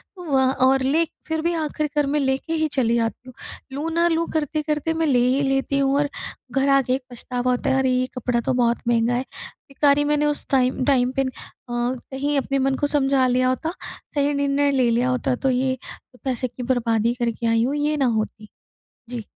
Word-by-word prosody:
तो 360 - -10
वहाँ 265 -1 +3
और 265 0 +3
ले 295 +6 +3 0.2
फ़िर 320 0 -1
भी 340 +2 0
आखिर 305 -2 -2
कर 295 -1 +3
मैं 295 +2 +1
लेके 270 +3 -1
ही 315 -1 +1
चली 235 -4 +2
जाती 230 +2 -2
हूँ। - - -12 0.4
लूँ 295 +4 -3
ना 340 +1 +3
लूँ 335 0 0
करते-करते 305 0 -1
मैं 325 0 0
ले 260 -4 +3
ही 260 +2 +2
लेती 270 +1 0
हूँ 275 0 +2
और 290 0 +1 0.4
घर 270 +2 +1
आके 275 -2 +3
एक 265 +1 -2
पछतावा 245 +1 -2
होता 250 - 0
है 265 - +2
अरे 265 -1 +2
ये 255 0 +1
कपड़ा 245 -1 0
तो 235 - -1
बहुत 240 -1 +2
महँगा 235 0 +2
है। 245 +1 0 0.5
बेकार 280 +1 +3
ही 290 - +2
मैंने 295 0 +1
उस 295 0 0
टाइम 255 -1 +2
टाइम 255 -3 +3
पे - - +4
अ, - - -3 0.5
कहीं 260 +4 -2
अपने 275 0 0
मन 270 0 +1
को 290 - 0
समझा 275 -2 +2
लिया 255 0 +2
होता। 315 +6 -2 0.4
सही 285 0 +2
निर्णय 280 0 +1
ले 255 -3 +2
लिया 240 +2 +1
होता 255 0 0
तो 265 +2 -1
ये 260 +1 +1 0.5
पैसे 255 -1 -1
की 250 +1 -8
बर्बादी 235 -2 +1
करके 235 0 -1
आई 230 0 +3
हूँ 270 +4 0
ये 295 +1 0
ना 275 - +2
होती। 215 -2 -2 0.6
जी। 240 -2 -5
265 Hz, 215 wpm, -22 LUFS, 250-290 Hz, 0.6 s, पे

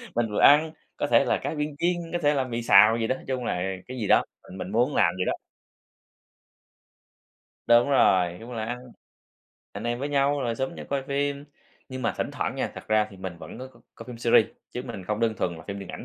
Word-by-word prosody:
Mình 115 -2 0
vừa - - -1
ăn, 155 +2 +6 0.3
có - - -1
thể - - +4
là - - +1
cá - - -2
viên 150 -1 -3
chiên, 175 +1 +2 0.2
có 175 - 0
thể 145 +1 +4
là 135 -2 +1
mì 120 -2 -4
xào 110 +2 +7
gì 115 -1 -1
đó, 130 - 0
nói - - -12
chung 130 -2 -2
là 90 - -1 0.3
cái 130 0 -7
gì 105 -4 -2
đó, - - +5 0.3
mình 95 - -9
mình 95 - -6
muốn 125 +6 +1
làm 85 - +3
vậy 90 - -1
đó. - - +1 2.3
Đúng 120 +3 +5
rồi, 90 -10 +3
chung 120 +2 -9
là 110 -2 -3
ăn, 120 +2 -4 0.9
anh 105 +3 -7
em 120 0 -1
với 140 +2 -3
nhau 140 0 +1
rồi 120 -3 -1
xúm 130 0 -3
nhau - - -9
coi 140 -1 0
phim. 140 +1 -2 0.4
Nhưng 130 0 -6
mà 115 - 0
thỉnh - - -2
thoảng - - -3
nha, - - -2
thật - - -10
ra 110 0 +3
thì 95 - -13
mình 95 -2 -7
vẫn - - -10
có 130 - -7
c 130 - -20
coi - - -11
phim 120 -2 -9
series, 115 -2 +4 0.2
chứ 125 - -5
mình 110 -7 -8
không 105 +3 -2
đơn 115 -1 +1
thuần 85 -2 -2
là 80 - -12
phim 100 0 -4
điện 100 - -8
ảnh - - -8
120 Hz, 245 wpm, -26 LUFS, 105-135 Hz, 2.3 s, xào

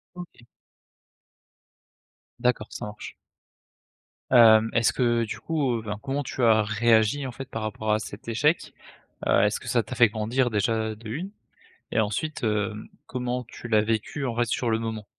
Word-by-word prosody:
OK. 175 -9 -11 1.9
D'accord 125 -3 0
ça - - -6
marche. 105 0 -9 1.2
Hem, 115 -2 +7
est-ce 115 -1 +3
que, 125 - -1 0.2
heu, - - 0
du 110 - -6
coup 145 -7 0
heu - - -2
enfin, 105 -1 -5
comment 140 +3 -2
tu 130 - -3
as 110 -2 +5
réagi 110 +4 +2
en 130 - -5
fait 135 +2 -8
par 110 - -5
rapport 110 0 -2
à 105 - +2
cet 105 +1 -9
échec? 145 +8 +1 0.5
Heu, - - +4
est-ce - - +1
que - - -9
ça - - +2
t'a - - -7
fait 120 0 +6
grandir 115 +4 0
déjà 110 +1 0
de 110 +1 -12
1? 160 - -4 0.6
Et - - +1
ensuite 125 +8 -2
heu, 105 -1 0 0.3
comment 125 0 -3
tu 120 +1 -10
l'as 110 -2 +4
vécu 115 +6 -2
en 120 -3 -2
fait 120 0 +2
sur 120 +1 -1
le 110 - +1
moment? 110 -2 -4
115 Hz, 180 wpm, -26 LUFS, 110-125 Hz, 1.9 s, Hem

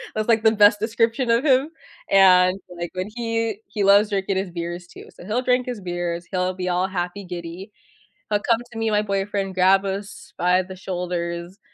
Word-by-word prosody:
That's, 215 0 -1
like, 220 -1 +3
the 220 - +6
best 205 -1 +5
description 230 +2 0
of 235 +5 +2
him, 270 +1 +3 0.4
and, 185 -1 +5 0.2
like, 175 0 -4
when 185 +2 -3
he 230 -2 -2
he 205 0 -2
loves 200 +2 +5
drinking 195 -1 -1
his 190 -1 -3
beers, 175 +1 -5
too. - - -13
So, - - -13
he'll 220 +5 -1
drink 250 0 +1
his 245 -4 -5
beers, 175 -1 -3
he'll 185 0 0
be 180 0 -3
all 180 +1 +1
happy 185 +1 -4
giddy, 175 +3 -7 0.6
he'll 210 -1 +2
come 230 -1 +4
to 230 - -9
me 225 - 0
and 215 - +1
my 210 - +3
boyfriend, 195 -1 -2
grab 190 +1 +4
us 195 +1 -6
by 180 +1 +3
the 190 +1 -10
shoulders, 175 0 -4
195 Hz, 200 wpm, -22 LUFS, 180-215 Hz, 0.6 s, the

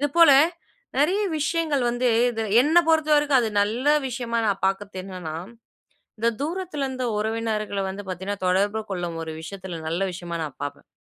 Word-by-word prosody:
இது 290 - +1
போல 335 -3 +8 0.7
நிறைய 360 +8 +3 0.2
விஷயங்கள் 305 -2 0
வந்து. 245 +1 +1 0.2
இது 225 -1 -3 0.2
என்ன 315 +4 +4
பொறுத்த 315 -1 +3
வரைக்கும். 290 -3 +4
அது 225 -2 -1
நல்ல 220 +5 0 0.2
விஷயமா 235 -2 -2
நான் 195 -2 0
பார்க்கறத்து 195 0 -2
என்னன்னா, 180 -5 -6 0.8
இந்த 230 - +2
தூரத்துல 325 -1 -3
இருந்த 260 -1 -4
உறவினர்கள 215 -2 -2
வந்து 195 +2 -5
பார்த்தீங்கன்னா 190 +2 -4
தொடர்பு 200 +4 +2
கொள்ளும் 175 -3 -3
ஒரு 160 - -5
விஷயத்துல 185 +1 -7
ஒரு 160 - -8
நல்ல 170 +4 -1
விஷயமா 175 -1 -5
நான் 145 -3 -8
பார்ப்பேன். 145 0 -6
220 Hz, 165 wpm, -24 LUFS, 190-280 Hz, 0.8 s, போல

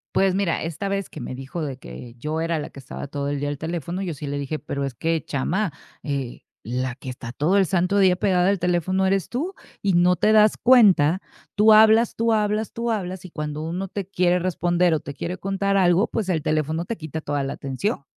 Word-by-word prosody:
Pues, 190 -1 +3
mira, 195 -4 0
esta 165 +5 -4
vez 195 -1 -2
que 155 - -9
me - - -5
dijo 135 +5 -5
de 135 -3 -4
que 115 - -10
yo 155 +4 -3
era 165 -1 -1
la - - -5
que 140 - -12
estaba 135 +2 -7
todo 140 0 -3
el 145 -1 -2
día 145 0 -2
al 145 - -4
teléfono, 170 +4 -4
yo 175 -4 -3
sí 145 0 -7
le 145 0 -3
dije: 145 +2 -3
"Pero 140 -1 -3
es 135 - -4
que 165 +5 -1
chama, 170 +5 -1 0.3
eh, 140 -4 -4 0.2
la 125 +2 -3
que 130 0 -9
está 125 -2 -7
todo 155 +10 +1
el 195 - +4
santo 185 +2 +1
día 185 -2 +5
pegada 185 0 +2
al 200 -3 +1
teléfono 180 +2 +1
eres 195 -2 +1
tú 330 +10 -3 0.3
y 195 -2 +1
no 175 +1 +4
te 215 - +2
das 215 -1 +5
cuenta, 195 - +5 0.4
tú 215 +1 +6
hablas, 220 +1 +6
tú 230 0 +1
hablas, 215 0 0
tú 235 0 -2
hablas 185 -3 -4
y 180 - -10
cuando 150 0 -4
uno 180 +4 -3
te 200 -2 -5
quiere 180 -2 +2
responder 175 -1 +1
o 155 - +1
te 140 0 -8
quiere 180 +4 -4
contar 195 0 0
algo, 180 +3 +4
pues, 205 -5 -3
el 160 -4 0
teléfono 155 +2 0
te 230 - -3
quita 160 -3 -6
toda 145 -1 -2
la 135 - -3
atención". 140 +4 -3
175 Hz, 230 wpm, -23 LUFS, 145-195 Hz, 0.4 s, tú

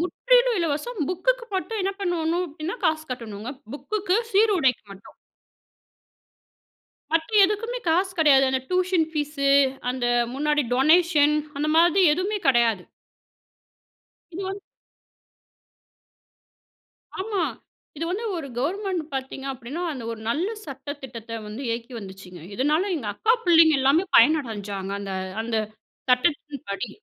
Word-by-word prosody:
முற்றிலும் - - +2
இலவசம். 335 +8 -2
புக்குக்கு 475 +7 0
மட்டும் 425 +3 -2
என்ன 390 +1 0
பண்ணணும் 350 -1 0
அப்படின்னா, 315 +6 -5
காசு 315 0 0
கட்டணுங்க. 225 -1 -7 0.2
புக்குக்கு, 395 +3 -1 0.2
சீருடைக்கு 385 - +3
மட்டும். 195 - -15 2.0
மற்ற 325 0 +1 0.2
எதுக்குமே 455 +5 -1
காசு 370 +4 +2
கிடையாது, 280 -4 +6
அந்த 260 0 0
டியூஷன் 365 -2 +1
ஃபீஸு, 295 -2 -1 0.4
அந்த 255 -1 -3 0.3
முன்னாடி 295 +1 +1
டொனேஷன், 305 +1 +4 0.2
அந்த 300 +1 0
மாதிரி 345 +3 +5
எதுவுமே 390 +5 -2
கிடையாது. 235 -7 +3 1.5
இது 375 +4 -5
வந்து 390 +1 -5 2.6
ஆமா. 400 0 -2 0.6
இது 325 - -3
வந்து 405 +6 -3
ஒரு 320 -4 -5
கவர்மெண்ட் 370 +5 -1
பார்த்தீங்க 265 0 -5
அப்படின்னா 265 +7 -6
அந்த 260 -5 -7
ஒரு 225 - -9
நல்ல 315 +10 0 0.2
சட்ட 275 0 -8
திட்டத்த 230 -3 -7
வந்து 215 +6 -7
இயக்கி 230 +2 -4
வந்துச்சுங்க, 190 -3 -11
இதனால 295 - +1
எங்க 260 -8 -6
அக்கா 445 - +2
பிள்ளைங்க 330 -2 +6
எல்லாமே 280 +7 +3
பயனடைஞ்சாங்க, 215 -8 +2
அந்த 195 -1 -5 0.3
அந்த 225 0 -2 0.5
சட்டத்தின்படி. 250 -5 0
305 Hz, 115 wpm, -24 LUFS, 255-365 Hz, 2.6 s, கிடையாது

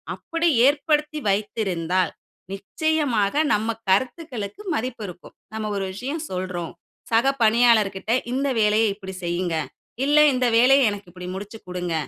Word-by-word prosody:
அப்டி 330 +1 -2 0.2
ஏற்படுத்தி 300 +1 +1
வைத்திருந்தால் 185 -4 -1 0.4
நிச்சயமாக 245 0 0 0.2
நம்ம 220 +2 -2
கருத்துக்களுக்கு 250 - -1
மதிப்பு 240 -3 -4
இருக்கும். 180 0 -12 0.2
நம்ம 215 -1 -3
ஒரு 195 - -2
விஷயம் 280 +10 -4
சொல்றோம், 180 -2 -4 0.4
சக 230 +4 +3
பணியாளர்கிட்ட 220 -3 +3 0.2
"இந்த 275 +2 0
வேலையை 215 +1 +3
இப்டி 190 -2 -9
செய்யுங்க, 175 -1 -1 0.5
இல்ல 295 +1 +3 0.2
இந்த 255 0 +1
வேலைய 265 +1 +6
எனக்கு 205 -3 -7
இப்டி 180 0 -9
முடிச்சுக்குடுங்க, 180 -4 -6
215 Hz, 120 wpm, -23 LUFS, 190-260 Hz, 0.5 s, வேலைய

